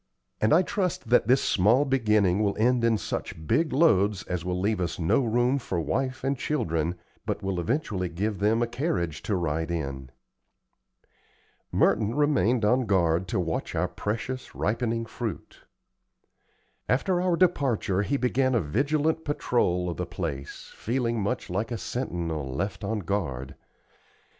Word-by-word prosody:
"And 110 Hz, -, +3 dB
I 175 Hz, -, +6 dB
trust 180 Hz, -, -2 dB
that 120 Hz, -3 st, +4 dB
this 130 Hz, +2 st, +4 dB
small 115 Hz, +9 st, +3 dB
beginning 105 Hz, -8 st, +2 dB
will 100 Hz, -2 st, 0 dB
end 120 Hz, +2 st, +2 dB
in 115 Hz, -1 st, +3 dB
such 80 Hz, -5 st, -5 dB
big 155 Hz, -, +2 dB
loads 105 Hz, -, +3 dB
as 90 Hz, -2 st, -3 dB
will 90 Hz, 0 st, -2 dB
leave 100 Hz, 0 st, 0 dB
us 85 Hz, -2 st, -2 dB
no 85 Hz, +10 st, +2 dB
room 120 Hz, +4 st, +2 dB
for 95 Hz, -8 st, -3 dB
wife 130 Hz, +9 st, -2 dB
and 135 Hz, +1 st, +1 dB
children, 85 Hz, -, -1 dB, 0.3 s
but 105 Hz, -, -2 dB
will 95 Hz, -2 st, -1 dB
eventually 95 Hz, -, -1 dB
give 100 Hz, +4 st, -2 dB
them 110 Hz, +3 st, +2 dB
a -, -, 0 dB
carriage 100 Hz, -, -2 dB
to 105 Hz, -, -1 dB
ride 80 Hz, -2 st, -1 dB
in." 70 Hz, -6 st, -4 dB, 1.6 s
Merton 110 Hz, +1 st, +2 dB
remained 125 Hz, -6 st, +2 dB
on 125 Hz, +2 st, +2 dB
guard 90 Hz, -2 st, +2 dB
to 90 Hz, -, -1 dB
watch 80 Hz, -3 st, -2 dB
our -, -, +1 dB
precious 125 Hz, +5 st, -4 dB
ripening 115 Hz, +1 st, -1 dB
fruit. 115 Hz, -1 st, -6 dB, 1.3 s
After 175 Hz, +8 st, +2 dB
our 180 Hz, -1 st, +2 dB
departure 135 Hz, -, +2 dB
he 140 Hz, +7 st, 0 dB
began 130 Hz, 0 st, +1 dB
a -, -, +4 dB
vigilant 145 Hz, -, 0 dB
patrol 90 Hz, -11 st, 0 dB
of 85 Hz, -, -3 dB
the 90 Hz, -, -3 dB
place, 80 Hz, -6 st, -6 dB
feeling 115 Hz, -1 st, -1 dB
much 100 Hz, -, -2 dB
like 105 Hz, +5 st, -2 dB
a 120 Hz, -, -3 dB
sentinel 85 Hz, -, -3 dB
left 95 Hz, +11 st, -3 dB
on 105 Hz, +1 st, -1 dB
guard. 70 Hz, -9 st, -3 dB
110 Hz, 155 wpm, -27 LUFS, 90-130 Hz, 1.6 s, I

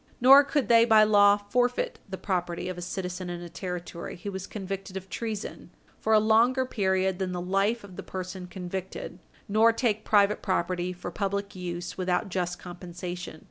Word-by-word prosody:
Nor 270 Hz, +3 st, +9 dB
could 280 Hz, -4 st, 0 dB
they 230 Hz, 0 st, +7 dB
by 220 Hz, -2 st, +6 dB
law 205 Hz, -1 st, +6 dB
forfeit 245 Hz, +4 st, 0 dB
the 190 Hz, -, -5 dB
property 180 Hz, -2 st, -2 dB
of 185 Hz, -, -4 dB
a 175 Hz, -, -7 dB
citizen 180 Hz, 0 st, -4 dB
in 175 Hz, 0 st, -4 dB
a 175 Hz, -, -8 dB
Territory 180 Hz, -1 st, -6 dB
who 200 Hz, +3 st, -6 dB
was 190 Hz, 0 st, -6 dB
convicted 195 Hz, -1 st, -5 dB
of 190 Hz, 0 st, -9 dB
treason, 220 Hz, +1 st, -5 dB, 0.3 s
for 220 Hz, -, +1 dB
a 215 Hz, -, +7 dB
longer 230 Hz, +4 st, +3 dB
period 190 Hz, -5 st, 0 dB
than 185 Hz, -1 st, -2 dB
the 180 Hz, -, -3 dB
life 195 Hz, +6 st, 0 dB
of 190 Hz, -3 st, -12 dB
the -, -, -4 dB
person 185 Hz, 0 st, -6 dB
convicted, 185 Hz, 0 st, -6 dB, 0.3 s
nor 220 Hz, +3 st, +5 dB
take 220 Hz, -2 st, 0 dB
private 205 Hz, 0 st, +3 dB
property 180 Hz, -1 st, -1 dB
for 175 Hz, 0 st, -7 dB
public 200 Hz, +1 st, -3 dB
use 175 Hz, 0 st, -5 dB
without 180 Hz, +1 st, 0 dB
just 180 Hz, -1 st, -2 dB
compensation. 175 Hz, -2 st, -7 dB
190 Hz, 180 wpm, -27 LUFS, 180-215 Hz, 0.3 s, Nor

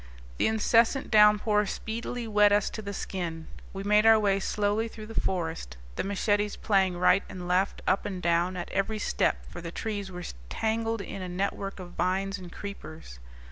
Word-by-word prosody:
The -, -, +3 dB
incessant 225 Hz, +4 st, +2 dB
downpour 210 Hz, -1 st, +5 dB
speedily 230 Hz, +3 st, -4 dB
wet 210 Hz, -1 st, +5 dB
us 205 Hz, 0 st, +2 dB
to -, -, -6 dB
the 200 Hz, -1 st, -5 dB
skin. 170 Hz, -5 st, -4 dB, 0.2 s
We 195 Hz, 0 st, -6 dB
made 210 Hz, +1 st, +4 dB
our 225 Hz, 0 st, +8 dB
way 200 Hz, -2 st, +2 dB
slowly 210 Hz, +3 st, 0 dB
through 220 Hz, -1 st, -9 dB
the 225 Hz, +1 st, -2 dB
forest, 160 Hz, -, -3 dB, 0.2 s
the -, -, -1 dB
machetes 205 Hz, +1 st, 0 dB
playing 190 Hz, -4 st, +1 dB
right 180 Hz, +2 st, +4 dB
and 180 Hz, -3 st, -7 dB
left, 185 Hz, +2 st, +1 dB
up 190 Hz, -, +2 dB
and 190 Hz, -3 st, -4 dB
down, 175 Hz, +1 st, +1 dB
at 175 Hz, -, -5 dB
every 205 Hz, +3 st, 0 dB
step, -, -, 0 dB
for -, -, -8 dB
the 170 Hz, -, -6 dB
trees 205 Hz, 0 st, -4 dB
were 180 Hz, -1 st, -7 dB, 0.3 s
tangled 225 Hz, 0 st, -1 dB
in 195 Hz, -, -6 dB
a 185 Hz, -, -5 dB
network 195 Hz, +2 st, -3 dB
of 180 Hz, -1 st, -8 dB
vines 195 Hz, +2 st, -1 dB
and 180 Hz, -2 st, -10 dB
creepers. 160 Hz, -, -9 dB
200 Hz, 180 wpm, -28 LUFS, 180-210 Hz, 0.3 s, our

